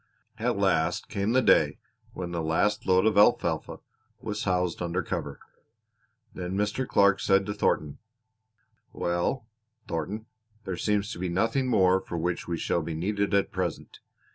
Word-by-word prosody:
At - - 0
last 80 +2 +1
came 100 +2 -1
the 130 0 +4
day - - +4 0.4
when 90 -1 -5
the 85 -1 -2
last 80 +6 0
load 95 +1 +4
of 110 -2 +4
alfalfa 105 - +2 0.4
was 105 -1 -4
housed 90 -2 0
under 85 +1 -1
cover; - - -4 0.9
then 90 0 -5
Mr. 105 +5 -1
Clark 100 -1 +4
said 95 0 +3
to 105 - -3
Thornton: 75 -7 0 0.9
"Well, 85 +8 -1 0.4
Thornton, 95 +7 -4 0.4
there 95 - -3
seems 105 +3 0
to - - -7
be 90 0 -2
nothing 115 +9 +1
more 95 -5 +4
for 85 - -6
which 85 +1 -2
we 85 -1 -2
shall 85 - 0
be 80 0 -4
needed 100 +4 0
at 100 - +1
present. - - -4
95 Hz, 155 wpm, -27 LUFS, 85-105 Hz, 0.9 s, the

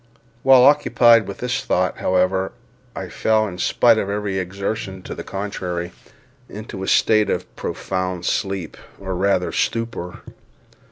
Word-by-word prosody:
While 130 -1 +6
occupied 120 -6 +5
with 100 - -6
this 125 +2 -2
thought, 90 0 0
however, 95 +1 +1 0.4
I - - -5
fell 110 -1 +1
in 90 -2 -8
spite 115 +4 +4
of 100 - -2
every 100 -1 -2
exertion 95 +1 -4
to - - -6
the - - -7
contrary, 90 -3 -4 0.6
into 105 -1 -8
a 95 - -4
state 110 -1 +3
of - - -3
profound 95 -2 -3
sleep, 95 -4 -2 0.2
or 95 -1 -4
rather 95 0 +1
stupor. 115 -6 -3
100 Hz, 135 wpm, -21 LUFS, 95-110 Hz, 0.6 s, While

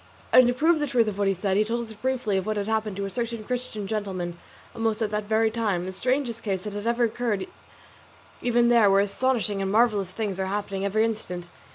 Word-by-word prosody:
And 255 -1 +8
to 245 - +2
prove 320 +4 +3
the 295 - 0
truth 245 -5 +2
of 200 -1 -6
what 200 - +2
he 195 - +3
said, 190 +1 0
he 210 - +4
told 235 +2 -2
us 220 -1 -9
briefly 240 -3 -1
what 215 +3 -2
had 200 0 -2
happened 220 -2 -1
to 200 - -2
a - - -4
certain 230 +1 -3
Christian 245 -3 -4
gentleman 190 -5 -3 0.3
almost 225 -1 -1
at 210 - -2
that 210 0 -2
very 220 +1 +2
time, 210 -6 -1
the 190 - -5
strangest 250 +3 -1
case 190 -3 -2
that 210 - -5
had 205 +2 -4
ever 235 +1 +2
occurred 230 -3 -1 1.0
even 240 0 +3
there, 230 -4 +6
where 195 0 +5
astonishing 210 0 0
and 195 0 -1
marvellous 210 -4 +3
things 195 -1 -3
are 190 - -1
happening 195 -1 -3
every 215 +3 +2
instant. 180 -6 -4
215 Hz, 225 wpm, -26 LUFS, 195-235 Hz, 1.0 s, And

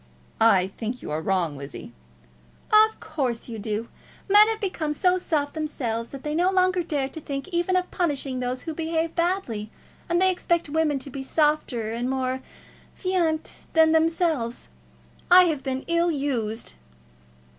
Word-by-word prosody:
"I 195 -5 +4
think 235 +2 -4
you - - -6
are 155 +1 -1
wrong, 175 -4 0
Lizzie." 140 0 -9 0.8
"Of 435 +1 +5
course 260 -7 -3
you 225 -3 -6
do. 215 +2 -3 0.4
Men 415 +2 +7
have 445 -1 -1
become 330 -6 -2
so 365 +4 +2
soft 295 -5 -1
themselves, 240 -7 -3
that 275 -1 -9
they 300 - -2
no 350 +4 +3
longer 370 -1 +2
dare 290 -5 -1
to 320 - -8
think 275 +2 -5
even 350 +1 0
of 365 0 0
punishing 280 -6 -1
those 250 0 -3
who 320 - -4
behave 325 +1 -1
badly, 335 - -1 0.4
and 345 0 +2
they 375 0 +5
expect 345 -3 0
women 305 -1 +1
to 270 +1 -6
be 275 - -5
softer 265 -6 0
and 240 +2 -2
more 260 0 -1 0.6
fainéant 345 -4 -1
than 320 -1 +5
themselves. 320 -7 +1 0.6
I 365 +1 +9
have 315 -6 0
been 265 0 -3
ill 335 +1 +2
used." 250 -7 -2
300 Hz, 160 wpm, -25 LUFS, 245-345 Hz, 0.8 s, I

